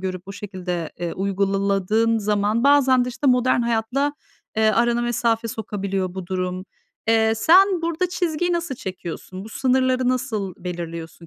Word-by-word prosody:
görüp 185 Hz, -1 st, -4 dB
o -, -, -5 dB
şekilde, 180 Hz, -5 st, -5 dB
eee, 175 Hz, -1 st, -3 dB
uygula 195 Hz, +1 st, 0 dB
ladığın 220 Hz, +4 st, +2 dB
zaman, 210 Hz, +3 st, 0 dB
bazen 265 Hz, -3 st, +5 dB
de, -, -, -4 dB
işte, 260 Hz, +3 st, -3 dB
modern 250 Hz, -1 st, +3 dB
hayatla, 235 Hz, +5 st, 0 dB, 0.4 s
eee, 220 Hz, -, +3 dB
arana 235 Hz, +2 st, +2 dB
mesafe 230 Hz, -1 st, 0 dB
sokabiliyor 195 Hz, -4 st, -3 dB
bu 190 Hz, -2 st, -6 dB
durum. 185 Hz, 0 st, -3 dB, 0.4 s
Eee, 225 Hz, 0 st, +4 dB
sen 365 Hz, -, +5 dB
burada 335 Hz, +2 st, 0 dB
çizgiyi 350 Hz, -1 st, -1 dB
nasıl 340 Hz, -5 st, -2 dB
çekiyorsun? 185 Hz, -1 st, -7 dB
Bu -, -, -9 dB
sınırları 255 Hz, +1 st, +1 dB
nasıl 215 Hz, -7 st, -2 dB
belirliyorsun 170 Hz, -2 st, -7 dB
220 Hz, 150 wpm, -22 LUFS, 190-255 Hz, 0.4 s, bazen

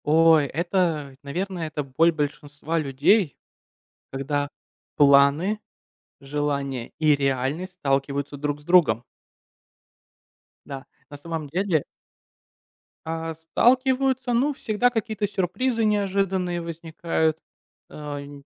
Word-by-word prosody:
Ой, 160 Hz, -1 st, +5 dB
это, 165 Hz, -3 st, -1 dB
наверное, 175 Hz, +4 st, -3 dB
это 150 Hz, -1 st, -4 dB
боль 150 Hz, +5 st, +3 dB
большинства 150 Hz, +1 st, -3 dB
людей, 145 Hz, -, +2 dB, 0.7 s
когда 145 Hz, +1 st, -2 dB, 0.5 s
планы, 145 Hz, +8 st, +4 dB, 0.6 s
желания 140 Hz, -3 st, -3 dB
и 155 Hz, -2 st, +4 dB
реальность 140 Hz, +6 st, -1 dB
сталкиваются 140 Hz, -2 st, -1 dB
друг 145 Hz, +1 st, -2 dB
с -, -, -19 dB
другом. 150 Hz, -, +4 dB, 1.6 s
Да, 135 Hz, -1 st, -7 dB, 0.2 s
на 145 Hz, -, -9 dB
самом 160 Hz, 0 st, -5 dB
деле 175 Hz, -1 st, +1 dB, 1.2 s
А, 165 Hz, 0 st, -3 dB
сталкиваются, 255 Hz, -, +2 dB
ну, 270 Hz, +5 st, +2 dB
всегда 245 Hz, -2 st, +1 dB
какие-то 220 Hz, -3 st, -2 dB
сюрпризы 205 Hz, +6 st, -1 dB
неожиданные 195 Hz, -4 st, 0 dB
возникают, 165 Hz, -1 st, -2 dB, 0.5 s
э, 145 Hz, -1 st, -6 dB
нь 140 Hz, 0 st, -11 dB
160 Hz, 95 wpm, -24 LUFS, 145-190 Hz, 1.6 s, Ой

